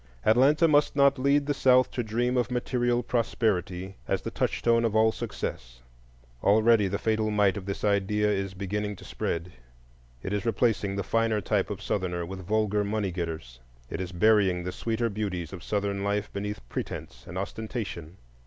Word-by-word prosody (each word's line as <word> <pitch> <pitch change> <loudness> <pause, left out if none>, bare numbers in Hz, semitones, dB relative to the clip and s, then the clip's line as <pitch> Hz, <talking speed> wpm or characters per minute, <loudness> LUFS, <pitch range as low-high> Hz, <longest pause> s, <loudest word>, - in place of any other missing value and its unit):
Atlanta 140 +9 +5
must 150 -2 +3
not 140 -1 +4
lead 140 +2 +3
the 145 - 0
South 130 -2 +4
to 125 - -2
dream 120 +3 0
of 120 -2 +1
material 120 -1 0
prosperity 95 -5 -1
as - - -1
the - - -4
touchstone 115 0 +1
of 110 -2 0
all 110 0 +5
success; - - -6 0.6
already 110 0 +4
the 100 +1 -1
fatal 110 0 0
might 105 -2 +3
of 100 -2 -6
this 100 - -4
idea 105 +1 +2
is 95 -2 -1
beginning 105 +2 -3
to - - -14
spread; 85 +2 -3 0.7
it 95 - -3
is 105 - -1
replacing 110 -4 +1
the 100 - -2
finer 115 -1 +1
type 100 0 0
of 100 -1 -5
Southerner 90 -3 -2
with 95 0 -8
vulgar 105 -1 +1
money 100 -1 -1
getters; 80 -8 -5 0.3
it 90 - -3
is 90 -1 -4
burying 95 -1 +3
the 90 - -3
sweeter 115 +4 -1
beauties 100 -6 -3
of 90 - -7
Southern 100 -1 -1
life 100 +1 -1
beneath 105 -7 -5
pretence - - -6
and 90 - -7
ostentation. 100 -4 -5
105 Hz, 170 wpm, -27 LUFS, 95-115 Hz, 0.7 s, Atlanta